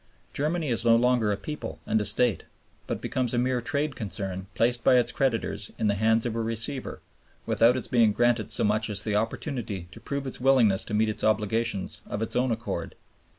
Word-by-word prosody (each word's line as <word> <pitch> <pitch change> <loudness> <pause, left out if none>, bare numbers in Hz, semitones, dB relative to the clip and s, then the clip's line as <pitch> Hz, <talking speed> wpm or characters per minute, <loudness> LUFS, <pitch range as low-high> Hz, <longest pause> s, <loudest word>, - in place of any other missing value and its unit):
Germany 155 +1 -1
is 115 -1 0
no 115 -1 +5
longer 120 -2 +2
a 100 - -1
people 150 +10 -6
and 110 0 +1
a - - -2
State, 110 +2 +2 0.4
but - - -3
becomes 125 -2 -2
a - - 0
mere 125 0 +1
trade 145 +3 -2
concern 95 -3 -5
placed 120 +1 +1
by - - +5
its 120 -1 +2
creditors 115 -5 -1
in - - -1
the 105 - +3
hands 110 +3 +2
of 115 -2 -2
a 115 - -1
receiver, 115 +4 -3 0.4
without 120 +3 +3
its 130 - -3
being 115 -3 +4
granted 120 0 +1
so - - +4
much 110 +1 +1
as 100 -1 +4
the 105 -2 -1
opportunity 110 - -3
to - - -12
prove 140 0 -4
its 130 - -6
willingness 125 -7 +4
to 105 - -3
meet 110 +1 +2
its 105 - -3
obligations 110 -1 0
of 105 +2 -3
its - - -5
own 125 +1 +2
accord. 115 - -4
115 Hz, 205 wpm, -26 LUFS, 105-125 Hz, 0.4 s, no